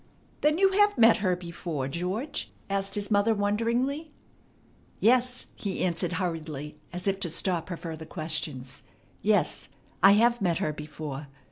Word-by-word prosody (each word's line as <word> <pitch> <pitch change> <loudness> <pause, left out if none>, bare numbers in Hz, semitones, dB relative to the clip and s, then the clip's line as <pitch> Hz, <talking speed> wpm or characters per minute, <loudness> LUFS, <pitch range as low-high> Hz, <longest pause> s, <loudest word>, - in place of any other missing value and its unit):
"Then 300 +1 +3
you 390 +1 +5
have 410 -2 +3
met 230 -1 +7
her 185 -3 +1
before, 170 -5 -4
George?" 185 - -3 0.2
asked 195 0 0
his 205 +1 -3
mother 205 +2 +4
wonderingly. 235 +9 0 0.9
"Yes," 250 +2 +3
he 195 -3 -3
answered 175 0 -1
hurriedly, 155 -5 -4
as 180 +1 -4
if 195 0 +1
to 175 - 0
stop 170 +1 0
her 175 - -4
further 160 -2 -6
question. 155 -5 -2 0.6
"Yes, - - +1 0.3
I 195 +1 +8
have 235 +2 +4
met 175 -4 +2
her 150 - -1
before. 150 -1 -6
185 Hz, 145 wpm, -28 LUFS, 160-230 Hz, 0.9 s, I